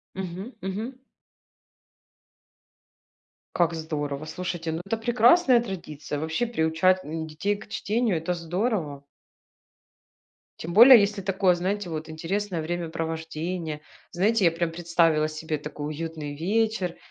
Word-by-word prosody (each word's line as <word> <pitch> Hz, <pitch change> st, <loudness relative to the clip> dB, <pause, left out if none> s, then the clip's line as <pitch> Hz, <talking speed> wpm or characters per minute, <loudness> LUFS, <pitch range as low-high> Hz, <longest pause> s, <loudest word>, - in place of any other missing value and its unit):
Мгм 190 Hz, +5 st, -6 dB
мгм. 215 Hz, +7 st, -4 dB, 2.6 s
Как 170 Hz, -1 st, +2 dB
здорово. 150 Hz, -2 st, -4 dB
Слушайте, 175 Hz, -1 st, -4 dB
ну 165 Hz, +2 st, -3 dB
это 225 Hz, +3 st, -1 dB
прекрасная 240 Hz, +3 st, +5 dB
традиция. 155 Hz, -8 st, -6 dB
Вообще 160 Hz, +9 st, -1 dB
приучать, 185 Hz, -2 st, +2 dB
м, 160 Hz, +1 st, -4 dB
детей 195 Hz, +7 st, -1 dB
к 210 Hz, -, -11 dB
чтению 220 Hz, -3 st, 0 dB
это 165 Hz, +3 st, -2 dB
здорово. 170 Hz, -, -2 dB, 1.6 s
Тем 170 Hz, +2 st, -5 dB
более, 240 Hz, +3 st, +10 dB
если 200 Hz, 0 st, 0 dB
такое, 190 Hz, -1 st, +2 dB
знаете, 190 Hz, +1 st, -2 dB
вот 160 Hz, 0 st, -5 dB
интересное 175 Hz, +2 st, -3 dB
времяпровождение. 165 Hz, -1 st, -4 dB, 0.3 s
Знаете, 200 Hz, +3 st, +2 dB
я 165 Hz, -, +5 dB
прям 165 Hz, 0 st, -2 dB
представила 165 Hz, -2 st, +2 dB
себе 155 Hz, 0 st, -4 dB
такой 150 Hz, 0 st, -6 dB
уютный 155 Hz, -2 st, -5 dB
вечер, 200 Hz, +1 st, 0 dB
175 Hz, 115 wpm, -26 LUFS, 160-205 Hz, 2.6 s, более